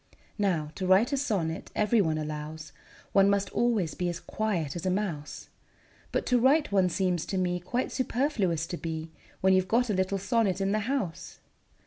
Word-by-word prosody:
Now, 170 -7 0
to 185 +4 -3
write 200 +9 +4
a - - +4
sonnet, 195 - -2
every 215 +1 +3
one 160 -4 0
allows, 155 0 -6 0.4
One 195 0 +5
must 200 0 +1
always 220 -10 +1
be 180 -1 -2
as 175 - -4
quiet 180 -10 -2
as 175 - -5
a 185 - +1
mouse; 180 -6 -3 0.6
But - - -1
to 250 -1 +3
write 275 +2 +3
one 190 -2 +3
seems 180 -2 0
to 195 - -2
me 180 -1 0
Quite 240 +9 -2
superfluous 230 - 0
to 175 - -5
be, 160 -1 -5 0.3
When 190 0 +4
you 185 - +5
've 185 - -10
got 240 +1 +2
a - - +1
little 190 +1 0
sonnet 195 -1 +1
in 195 0 0
the 215 - +2
house. 210 - -3
190 Hz, 190 wpm, -28 LUFS, 165-215 Hz, 0.6 s, One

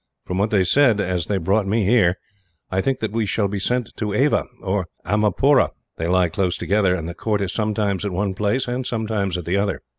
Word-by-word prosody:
"From 90 +1 -3
what 105 +2 +2
they 100 -3 +3
said 120 +2 +4
as 90 -4 -1
they 100 - 0
brought 95 +4 +1
me 105 +1 +1
here, 100 -4 +3 0.5
I 95 0 +1
think 135 +4 -1
that 110 - -2
we 110 -1 -1
shall 100 +1 +1
be 100 0 -3
sent 125 +3 -1
to 105 -2 -2
Ava, 140 +6 +2 0.2
or 95 -2 -1 0.2
Amarapura. 105 +7 +3 0.3
They 80 - -2
lie 90 0 +3
close 90 +1 -1
together, 100 -3 +2
and 80 -3 -4
the 85 - -5
court 105 +4 -1
is 95 -2 -2
sometimes 105 -3 -1
at 100 - -2
one 95 +2 -1
place 105 +6 0
and 125 +1 -2
sometimes 110 -6 -2
at 90 - -6
the 90 +3 0
other. 100 -1 -1
100 Hz, 220 wpm, -21 LUFS, 95-110 Hz, 0.5 s, said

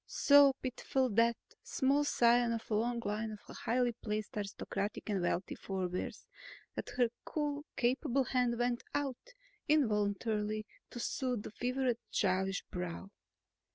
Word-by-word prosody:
So 285 -1 +6
pitiful, 260 0 0
that 230 +2 +3 0.2
small 275 +2 +2
scion 240 -3 +4
of 225 0 -5
a - - +2
long 235 +3 +1
line 215 +2 -2
of - - -10
highly 245 +1 +1
placed 215 -2 -4
aristocratic 205 0 -3
and 195 -2 0
wealthy 175 +2 -1
forebears, 185 -2 -4 0.5
that - - -5
her 245 -2 +4
cool, 295 -1 -2
capable 255 +1 +2
hand 250 -2 +1
went 245 0 0
out 290 - -3 0.3
involuntarily 215 -5 +1 0.2
to 240 - -7
soothe 250 -3 -1
the - - -7
fevered 250 +1 0
childish 190 0 +1
brow. 180 +2 -5
235 Hz, 130 wpm, -34 LUFS, 210-255 Hz, 0.5 s, So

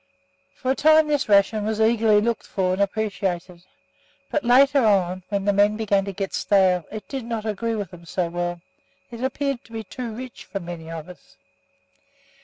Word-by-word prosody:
For 260 - -1
a - - +1
time 310 +1 +5
this 290 -6 0
ration 205 +1 +4
was 215 +1 -2
eagerly 220 -1 +4
looked 230 0 -2
for 185 -2 0
and 190 - -1
appreciated, 190 -4 -2 0.7
but 300 - 0
later 270 +3 +5
on, 185 -4 +2
when 200 -2 -1
the 205 - +3
men 205 +1 +3
began 200 -3 +1
to 200 - -4
get 195 0 -4
stale, 185 -4 +2
it 215 0 -7
did 270 -3 -5
not 230 -2 -4
agree 225 +2 -2
with 205 -3 -4
them 170 -1 -13
so 175 +1 -1
well; 175 0 -3 0.5
it 235 +1 -7
appeared 275 -1 -2
to - - -19
be 225 -1 -5
too 240 +3 -6
rich 250 +3 -8
for 195 - -5
many 170 -2 -8
of 165 -1 -7
us. 180 - -15
210 Hz, 190 wpm, -23 LUFS, 185-235 Hz, 0.7 s, time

